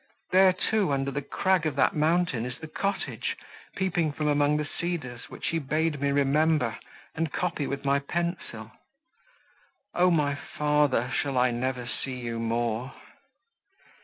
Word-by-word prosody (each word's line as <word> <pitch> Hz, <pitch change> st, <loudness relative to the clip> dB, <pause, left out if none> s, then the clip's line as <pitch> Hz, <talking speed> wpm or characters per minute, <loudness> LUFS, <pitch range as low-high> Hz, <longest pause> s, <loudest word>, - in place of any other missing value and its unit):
There, 185 Hz, 0 st, +7 dB
too, 195 Hz, -1 st, +1 dB
under 135 Hz, 0 st, 0 dB
the 140 Hz, +2 st, -2 dB
crag 180 Hz, +4 st, +1 dB
of 150 Hz, -, -2 dB
that 140 Hz, -, +3 dB
mountain, 155 Hz, -5 st, +2 dB
is 125 Hz, 0 st, -5 dB
the 160 Hz, -, -8 dB
cottage, 195 Hz, +6 st, -2 dB, 0.4 s
peeping 175 Hz, -5 st, 0 dB
from 150 Hz, +1 st, -2 dB
among 145 Hz, 0 st, +3 dB
the 150 Hz, -, -1 dB
cedars, 145 Hz, -7 st, -4 dB
which -, -, -4 dB
he 165 Hz, -, 0 dB
bade 155 Hz, 0 st, 0 dB
me 140 Hz, -, +2 dB
remember, 140 Hz, -2 st, +2 dB, 0.3 s
and 160 Hz, -1 st, -2 dB
copy 170 Hz, -5 st, -1 dB
with 140 Hz, 0 st, -4 dB
my 140 Hz, 0 st, +3 dB
pencil. 140 Hz, -8 st, -4 dB, 1.2 s
O 180 Hz, +1 st, +4 dB
my 150 Hz, -4 st, +2 dB
father, 145 Hz, -3 st, +1 dB
shall 140 Hz, -2 st, 0 dB
I 125 Hz, 0 st, +4 dB
never 125 Hz, 0 st, -2 dB
see 130 Hz, +2 st, -4 dB
you 120 Hz, -2 st, -4 dB
more!" 115 Hz, +2 st, -1 dB
145 Hz, 150 wpm, -27 LUFS, 130-165 Hz, 1.2 s, There